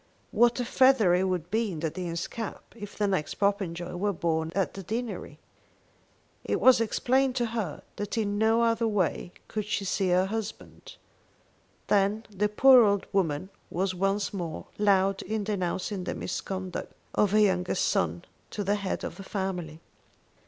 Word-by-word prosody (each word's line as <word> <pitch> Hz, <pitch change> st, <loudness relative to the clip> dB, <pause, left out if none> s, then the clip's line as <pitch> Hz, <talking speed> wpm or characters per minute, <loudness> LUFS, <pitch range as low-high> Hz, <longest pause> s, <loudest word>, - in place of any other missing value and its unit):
What 240 Hz, +1 st, +3 dB
a 245 Hz, -, -1 dB
feather 255 Hz, -7 st, +4 dB
it 180 Hz, +1 st, +2 dB
would 180 Hz, -2 st, -2 dB
be 220 Hz, -1 st, +1 dB
in 160 Hz, -3 st, -6 dB
the 160 Hz, -2 st, -1 dB
Dean's 170 Hz, -1 st, -3 dB
cap 225 Hz, -3 st, -6 dB
if 205 Hz, -3 st, -9 dB
the 210 Hz, -, +1 dB
next 190 Hz, -7 st, -1 dB
Popenjoy 190 Hz, -4 st, -1 dB
were 200 Hz, +3 st, 0 dB
born 160 Hz, -3 st, -1 dB
at 195 Hz, -1 st, 0 dB
the 195 Hz, -, -7 dB
deanery. 225 Hz, +5 st, -5 dB, 1.1 s
It -, -, -1 dB
was 255 Hz, -2 st, +6 dB
explained 255 Hz, +4 st, +1 dB
to 240 Hz, -2 st, +1 dB
her 220 Hz, -9 st, -4 dB
that 205 Hz, +3 st, -4 dB
in 205 Hz, -2 st, 0 dB
no 225 Hz, +1 st, +3 dB
other 230 Hz, 0 st, +2 dB
way 190 Hz, -5 st, -1 dB, 0.2 s
could 215 Hz, -2 st, -3 dB
she 205 Hz, -1 st, -2 dB
see 190 Hz, 0 st, 0 dB
her 180 Hz, +1 st, +3 dB
husband. 220 Hz, +1 st, -6 dB, 0.9 s
Then 205 Hz, +2 st, +2 dB
the 210 Hz, +1 st, 0 dB
poor 255 Hz, +3 st, +7 dB
old 200 Hz, -2 st, +2 dB
woman 185 Hz, -1 st, 0 dB, 0.2 s
was 185 Hz, +2 st, -1 dB
once 195 Hz, +2 st, 0 dB
more 170 Hz, -5 st, -5 dB
loud 195 Hz, -1 st, +3 dB
in 215 Hz, -1 st, -3 dB
denouncing 190 Hz, -1 st, -2 dB
the -, -, -3 dB
misconduct 185 Hz, -2 st, -5 dB, 0.2 s
of 210 Hz, -, +3 dB
her 215 Hz, -, +5 dB
youngest 185 Hz, -3 st, +2 dB
son 85 Hz, 0 st, 0 dB, 0.2 s
to 205 Hz, -, -4 dB
the 200 Hz, +2 st, +1 dB
head 200 Hz, -2 st, -3 dB
of -, -, -5 dB
the 195 Hz, -, -8 dB
family. 180 Hz, -5 st, -4 dB
200 Hz, 165 wpm, -28 LUFS, 180-215 Hz, 1.1 s, poor